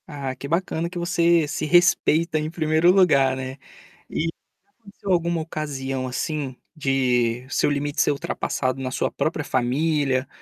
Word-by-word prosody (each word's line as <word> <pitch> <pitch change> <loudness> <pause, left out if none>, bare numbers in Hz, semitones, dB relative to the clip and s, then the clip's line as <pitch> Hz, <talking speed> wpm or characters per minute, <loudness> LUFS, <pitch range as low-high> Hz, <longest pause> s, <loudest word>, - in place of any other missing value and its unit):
Ah, 140 -3 -5
que 140 - -7
bacana 170 +1 -1
que 180 - -8
você 170 -2 +2
se 145 +1 -3
respeita 165 -1 +3
em 155 +1 -3
1º 160 +1 +3
lugar, 140 -9 +4
né. 130 +1 -6 0.5
E 160 - -1
já - - -31 0.3
aconteceu 200 -2 -6
alguma 170 -1 +1
ocasião, 135 -4 -4
assim, 135 +1 -3 0.2
de 125 -4 +1
seu - - +1
limite 145 0 -1
ser - - +3
ultrapassado 135 -2 -2
na 130 -1 -3
sua - - 0
própria 155 -1 -2
família, 135 +1 0
150 Hz, 150 wpm, -23 LUFS, 135-165 Hz, 0.5 s, lugar